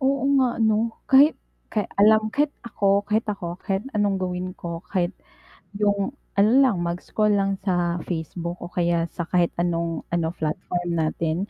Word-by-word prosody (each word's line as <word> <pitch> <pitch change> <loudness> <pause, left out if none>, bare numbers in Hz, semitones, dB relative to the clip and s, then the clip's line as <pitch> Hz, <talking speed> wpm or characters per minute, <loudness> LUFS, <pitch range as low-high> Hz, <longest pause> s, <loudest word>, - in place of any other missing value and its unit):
Oo, 270 0 +1 0.2
nga, 250 -2 +1
'no? 225 0 +1
Kahit 280 +3 +6 0.3
kay 210 -2 -1 0.2
alam 215 +1 +5
kahit 295 +1 +2 0.2
ako, 200 -3 +1
kahit 215 +2 0
ako, 175 -3 -4
kahit 195 +2 -2
anong 205 -2 +2
gawin 185 0 -3
ko 170 -1 -6
kahit 180 -1 0 0.6
yung 205 +5 0 0.2
ano 205 +2 +5
lang 245 -7 +2
mag-scroll 180 +5 0
lang 195 -1 0
sa 175 -3 0
Facebook 170 +1 -4
o 175 - -8
kaya 170 -1 +1
sa 170 - -4
kahit 175 -2 +2
anong 170 -1 -1
ano, 165 -1 0
platform 175 +2 -3
natin. 160 0 0
190 Hz, 155 wpm, -24 LUFS, 170-215 Hz, 0.6 s, Kahit